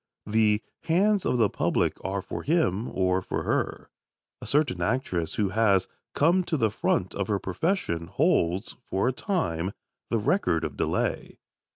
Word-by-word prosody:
The 105 0 +2 0.2
hands 195 +4 +2
of 125 - +1
the 115 -3 +4
public - - 0
are 95 0 -2
for - - -5
him, 125 - +1
or 95 0 +1
for - - -3
her. - - -2 0.5
A - - -7
certain 145 -3 +1
actress 100 -9 -1
who 105 -3 +1
has 100 -2 +3 0.3
"come 175 +5 +4
to 165 - 0
the 110 -5 +2
front 95 -3 0
of 100 -2 -2
her 105 - +1
profession" 95 - -1
holds, 100 - +1
for 95 +2 -1
a 130 - +1
time, 95 - -1 0.4
the 115 - +1
record 105 - +1
of - - -3
delay. - - -1
105 Hz, 160 wpm, -27 LUFS, 95-155 Hz, 0.5 s, the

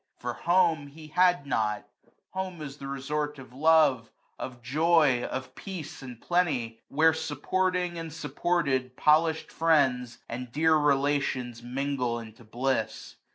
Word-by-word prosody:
For - - -4
home 165 -4 +2
he 155 +2 -12
had 180 -2 +3
not; 105 -6 -1 0.4
home 190 -2 -4
is 145 -2 -7
the 135 - -7
resort 145 +2 -2
65 135 -2 -10
Of 130 - -12
love, 150 -7 +4 0.3
of 125 -2 -7
joy, 150 -1 +3
of 130 0 -5
peace 175 -2 -7
and 125 -3 -9
plenty; 135 -11 0
where,. 160 +3 +4
Supporting 180 +3 -1
and 165 -1 -6
supported, 145 -4 -1
polished 160 +1 +3
friends^ 130 -7 +2
And 125 +1 -6
dear 160 +4 +3
relations 140 -4 +1
mingle 125 -1 -2
into 115 0 -10
bliss. 120 0 -2
145 Hz, 135 wpm, -28 LUFS, 125-160 Hz, 0.4 s, love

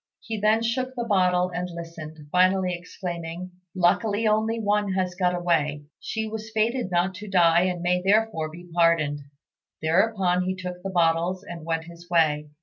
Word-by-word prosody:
He 225 -2 -5
then 215 +2 +3
shook 255 +3 -1
the 240 - -2
bottle 185 -4 +2
and 180 0 -3
listened, 160 -3 -9
finally 185 0 +3
exclaiming, 175 0 -6 0.2
"Luckily 205 +5 +2
only 220 +2 +1
one 205 -2 +1
has 185 -1 -1
got 180 -1 +1
away. 155 -4 0 0.2
She 220 0 -3
was 220 0 -6
fated 225 0 0
not 180 +1 +1
to 210 +3 -9
die, 175 -2 +4
and 180 -2 -2
may 180 0 +2
therefore 200 -5 +1
be 175 +3 -12
pardoned." 165 -4 +2 0.6
Thereupon 180 +2 +2
he 185 0 -1
took 180 -1 -6
the 195 - -4
bottles 175 +1 +1
and 170 -5 -9
went 165 -1 -1
his 170 +1 -13
way. 155 -3 +2
180 Hz, 165 wpm, -25 LUFS, 170-205 Hz, 0.6 s, die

